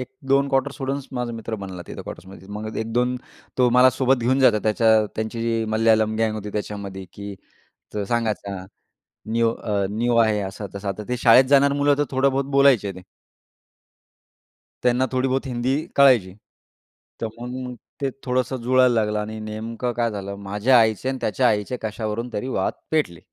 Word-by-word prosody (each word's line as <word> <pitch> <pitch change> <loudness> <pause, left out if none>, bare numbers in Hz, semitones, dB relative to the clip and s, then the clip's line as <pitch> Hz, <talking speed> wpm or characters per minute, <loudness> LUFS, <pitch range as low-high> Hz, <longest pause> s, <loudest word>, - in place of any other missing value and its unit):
1-2 135 +2 0
quarter 135 0 +1
सोडूनच 135 0 -4
माझा 125 -2 -3
मित्र 115 0 -5
बनला 90 -2 -7
तिथं - - -8
क्वार्टर्समध्ये. 95 +1 -11
मग 105 +1 -6
अ, - - -3
1-2 125 +3 0 0.4
तो 125 -1 +5
मला 130 +1 +7
सोबत 130 +1 +2
घेऊन 130 +3 +2
जातो 120 -5 +5
त्याच्या 110 0 +4
त्यांची 110 +1 -3
जी 115 -1 0
मल्याळम 110 -1 +3
गँग 110 -1 +1
होती 105 -1 -6
त्याच्यामध्ये 100 -2 -5
की 100 0 -7 0.6
तर 105 -1 -1
सांगायचा 105 -4 -2 0.7
न्यू 115 0 +2
अ 100 -3 -1
न्यू 120 +2 0
आहे. 110 -2 +3
असं-तसं 100 +1 -6
आता. 100 +2 -4
ते 125 - -1
शाळेत 125 +2 +7
जाणार 140 0 +5
मुलं 145 0 +3
तर 145 - +2
थोडं-बहुत 135 +1 +1
बोलायचे 135 -7 +4
ते. 95 - -11 1.8
त्यांना 125 +1 +3
थोडी 130 +1 +1
बहुत 135 +1 -1
हिंदी 125 +1 0 0.2
कळायची. 125 -10 +5 0.9
तर 115 - -1
मग 125 +1 -5 0.3
ते 135 - +1
थोडंसं 130 +1 -1
जुळायला 130 0 +4
लागलं 105 -2 +1
आणि 110 +1 -5
नेमकं 110 +3 -4
काय 115 -2 0
झालं, 100 -1 -5
माझ्या 105 +6 +3
आईचे 110 +3 +1
आणि 135 - -2
त्याच्या 125 +4 +2
आईचे 105 +4 0
कशावरून 110 +2 -3
तरी 105 +5 -3
वाद 95 - 0 0.2
पेटले. 145 - 0
115 Hz, 165 wpm, -23 LUFS, 105-130 Hz, 1.8 s, मला